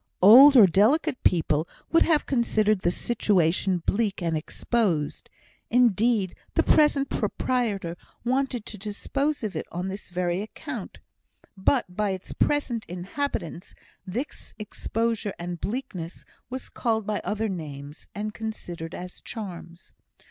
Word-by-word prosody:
Old 265 Hz, +8 st, +10 dB
or 220 Hz, -, +10 dB
delicate 255 Hz, -, +3 dB
people 160 Hz, -2 st, +2 dB, 0.2 s
would 330 Hz, -, +5 dB
have 315 Hz, -3 st, +3 dB
considered 215 Hz, -5 st, +2 dB
the 175 Hz, -, +2 dB
situation 185 Hz, -3 st, +1 dB
bleak 205 Hz, -2 st, 0 dB
and 165 Hz, -3 st, -1 dB
exposed; 165 Hz, -1 st, -1 dB, 0.4 s
indeed, 225 Hz, -4 st, +3 dB, 0.2 s
the -, -, +4 dB
present 295 Hz, -2 st, +4 dB
proprietor 210 Hz, -6 st, -1 dB, 0.3 s
wanted 255 Hz, -2 st, 0 dB
to 210 Hz, -, -8 dB
dispose 275 Hz, +8 st, -2 dB
of 210 Hz, -3 st, -3 dB
it -, -, -4 dB
on 180 Hz, +2 st, -3 dB
this 195 Hz, +1 st, -7 dB
very 180 Hz, 0 st, -1 dB
account; 215 Hz, -, -7 dB, 0.6 s
but 190 Hz, -1 st, +1 dB
by 210 Hz, 0 st, 0 dB
its 190 Hz, -1 st, -5 dB
present 250 Hz, -6 st, 0 dB
inhabitants, 180 Hz, -, -4 dB, 0.3 s
this 220 Hz, +10 st, -6 dB
exposure 220 Hz, 0 st, -2 dB
and 175 Hz, 0 st, -6 dB
bleakness 200 Hz, -8 st, -5 dB, 0.2 s
were 255 Hz, -, -3 dB, 0.2 s
called 220 Hz, -3 st, 0 dB
by 210 Hz, 0 st, -2 dB
other 215 Hz, +2 st, -1 dB
names, 150 Hz, -6 st, -7 dB
and 210 Hz, +1 st, -3 dB
considered 175 Hz, -7 st, -6 dB
as 180 Hz, 0 st, -8 dB
charms. 180 Hz, -5 st, -8 dB
210 Hz, 125 wpm, -26 LUFS, 180-235 Hz, 0.6 s, Old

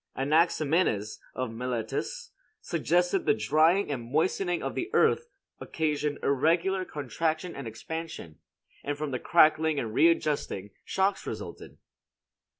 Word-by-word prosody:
Anaximenes, 155 Hz, -, +1 dB, 0.2 s
of 130 Hz, -3 st, -3 dB
Miletus, 125 Hz, -, -4 dB, 0.3 s
suggested 175 Hz, +2 st, 0 dB
the -, -, +5 dB
drying 155 Hz, -, +3 dB
and 120 Hz, -2 st, -5 dB
moistening 175 Hz, +3 st, 0 dB
of -, -, -3 dB
the 350 Hz, -, -3 dB
earth 475 Hz, -, +3 dB, 0.3 s
occasioned 150 Hz, -2 st, -1 dB
irregular 170 Hz, +7 st, +2 dB
contraction 155 Hz, +5 st, -2 dB
and 140 Hz, -3 st, -6 dB
expansion, 160 Hz, -, -7 dB, 0.4 s
and 145 Hz, 0 st, -3 dB
from 150 Hz, -1 st, -3 dB
the 130 Hz, -, -2 dB
cracking 155 Hz, -1 st, +4 dB
and 110 Hz, -4 st, -4 dB
readjusting 150 Hz, -, +1 dB
shocks 195 Hz, +1 st, 0 dB
resulted. 105 Hz, -6 st, -7 dB
155 Hz, 115 wpm, -28 LUFS, 130-170 Hz, 0.4 s, the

